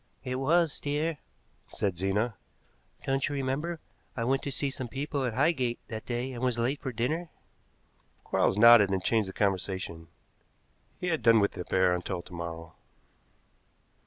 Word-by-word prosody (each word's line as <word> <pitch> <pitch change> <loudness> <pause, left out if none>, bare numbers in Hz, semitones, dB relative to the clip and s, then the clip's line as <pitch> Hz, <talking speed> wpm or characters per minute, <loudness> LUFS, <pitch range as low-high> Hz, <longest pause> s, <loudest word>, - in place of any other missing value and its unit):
"It 130 -1 -3
was, 160 +4 +2
dear," 150 +2 -1 0.5
said 100 -3 -2
Zena. 100 +6 0 0.7
"Don't 135 +1 +1
you 145 - -3
remember, 140 +5 -2 0.4
I 115 - 0
went 135 +3 +1
to 140 - -4
see 135 +1 -1
some 130 -2 -5
people 140 +3 -3
at 120 -3 -2
Highgate 130 -5 +1
that 110 -2 -6
day 125 +2 -2
and 120 - -6
was 125 -2 +1
late 125 +5 0
for 135 -3 -3
dinner?" 155 +9 -2 0.9
Quarles - - +1
nodded 115 -2 +8
and 95 -1 -1
changed 110 -3 +1
the - - -8
conversation; 95 -4 -2 0.9
he 180 - -2
had 165 -2 0
done 115 -1 +6
with 100 - +2
the 90 - -7
affair 95 0 +2
until 90 0 -3
to 90 - -14
morrow. 85 -1 -6
120 Hz, 160 wpm, -29 LUFS, 95-140 Hz, 0.9 s, nodded